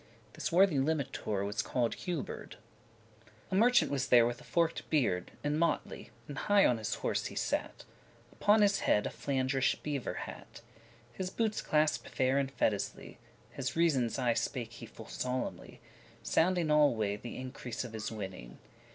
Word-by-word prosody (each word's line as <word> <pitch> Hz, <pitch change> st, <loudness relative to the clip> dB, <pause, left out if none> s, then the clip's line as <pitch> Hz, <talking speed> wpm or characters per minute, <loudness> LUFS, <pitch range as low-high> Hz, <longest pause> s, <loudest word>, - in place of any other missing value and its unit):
This -, -, -3 dB
worthy 180 Hz, -3 st, +5 dB
limitour 135 Hz, -8 st, -1 dB
<18> -, -, -1 dB
was 105 Hz, +1 st, -1 dB
call'd 120 Hz, -2 st, 0 dB
Huberd. 175 Hz, -5 st, -5 dB, 1.0 s
A -, -, 0 dB
MERCHANT 240 Hz, 0 st, +4 dB
was 135 Hz, -2 st, 0 dB
there 120 Hz, -2 st, +6 dB
with 120 Hz, 0 st, -3 dB
a -, -, -13 dB
forked 170 Hz, -1 st, 0 dB
beard, 115 Hz, -, +1 dB
In 145 Hz, +1 st, 0 dB
motley, 170 Hz, -, -1 dB, 0.2 s
and 145 Hz, -2 st, -6 dB
high 205 Hz, -1 st, +4 dB
on 120 Hz, -2 st, +3 dB
his 110 Hz, -, -2 dB
horse -, -, -1 dB
he -, -, -9 dB
sat, -, -, -2 dB, 0.5 s
Upon 210 Hz, +1 st, +4 dB
his 200 Hz, -1 st, +3 dB
head 105 Hz, -, +2 dB
a -, -, -2 dB
Flandrish 135 Hz, -1 st, 0 dB
beaver 145 Hz, -4 st, -3 dB
hat. -, -, -8 dB, 0.5 s
His 185 Hz, +5 st, -3 dB
bootes 220 Hz, +2 st, -1 dB
clasped 155 Hz, 0 st, +1 dB
fair 130 Hz, +1 st, +2 dB
and 135 Hz, -1 st, -1 dB
fetisly*. 105 Hz, -6 st, 0 dB
*neatly -, -, -13 dB, 0.4 s
His 130 Hz, -2 st, -3 dB
reasons 145 Hz, -9 st, +2 dB
aye 125 Hz, -3 st, +2 dB
spake -, -, -3 dB
he -, -, -9 dB
full -, -, -12 dB
solemnly, 125 Hz, 0 st, -4 dB, 0.4 s
Sounding 170 Hz, -2 st, +2 dB
alway 115 Hz, -9 st, +3 dB
th' 105 Hz, -, -14 dB
increase 125 Hz, -1 st, -5 dB
of 120 Hz, -2 st, -8 dB
his 110 Hz, 0 st, -4 dB
winning. 95 Hz, -, -7 dB
135 Hz, 165 wpm, -32 LUFS, 120-165 Hz, 1.0 s, there